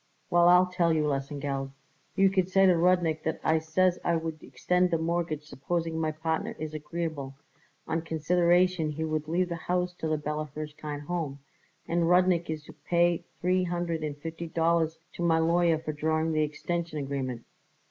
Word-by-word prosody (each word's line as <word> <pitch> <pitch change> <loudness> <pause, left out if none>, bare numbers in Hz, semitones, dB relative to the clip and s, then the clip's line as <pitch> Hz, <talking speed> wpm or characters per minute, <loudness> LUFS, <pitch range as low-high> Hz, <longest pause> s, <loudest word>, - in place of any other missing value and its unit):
"Well, 175 0 +6
I'll 180 +1 +7
tell 180 -2 +1
you," 155 -1 +2
Lesengeld 140 -1 -2
said; 135 - -19 0.4
"you 195 0 +5
could 185 -1 +1
say 195 +1 +5
to 185 - +6
Rudnik 170 -2 +2
that 160 - -2
I 160 0 +3
says 175 +3 +1
I 170 - +2
would 160 -1 -4
extend 180 +8 +1
the 165 - +1
mortgage 165 -2 -1
supposing 160 +3 -3
my 155 -1 0
partner 160 +1 -2
is 155 0 -5
agreeable, 155 -3 -4 0.5
on 165 +1 0
consideration 175 +1 +2
he 155 +1 -3
would 155 -1 -2
leave 175 +3 +1
the 170 - -2
house 180 0 0
to 160 - -2
the 155 0 +1
Bella 150 0 -3
Hirshkind 150 -1 -6
Home, 150 -3 -3 0.5
and 170 0 +1
Rudnik 180 -2 +3
is 155 -1 -3
to - - -13
pay 175 -1 +1 0.2
three 185 +1 +2
hundred 170 -2 -2
and 150 -2 -3
fifty 165 +2 -6
dollars 165 0 +1 0.2
to - - -7
my 165 -1 +3
lawyer 165 0 +3
for 155 -1 -5
drawing 155 +2 0
the 155 -1 +1
extension 165 +2 -2
agreement." 135 -4 -3
160 Hz, 180 wpm, -28 LUFS, 155-175 Hz, 0.5 s, I'll